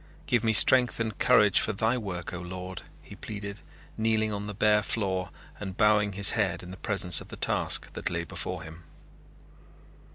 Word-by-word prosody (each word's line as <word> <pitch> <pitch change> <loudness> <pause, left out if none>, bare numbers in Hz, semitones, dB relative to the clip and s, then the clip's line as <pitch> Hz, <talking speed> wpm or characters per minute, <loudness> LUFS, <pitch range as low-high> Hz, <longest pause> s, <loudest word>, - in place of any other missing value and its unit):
"Give 120 -2 0
me 110 - +2
strength 125 +3 +6
and 110 -3 -3
courage 105 -6 +4
for 110 - -2
Thy 110 +4 0
work, 95 -9 -6
O 90 - -5
Lord!" 90 0 -8 0.2
he - - -13
pleaded, 100 -1 -8 0.4
kneeling 110 -1 0
on 100 0 -5
the 105 - -7
bare 105 +1 +2
floor 95 -4 -2 0.3
and 95 -2 -7
bowing 105 -2 +2
his 100 +1 +4
head 100 -7 -2
in 90 - -10
the 95 - -10
presence 100 -5 +3
of - - -12
the - - -9
task - - -1
that - - -3
lay - - -3
before - - -7
him. 80 +2 -12
105 Hz, 185 wpm, -27 LUFS, 95-110 Hz, 0.4 s, strength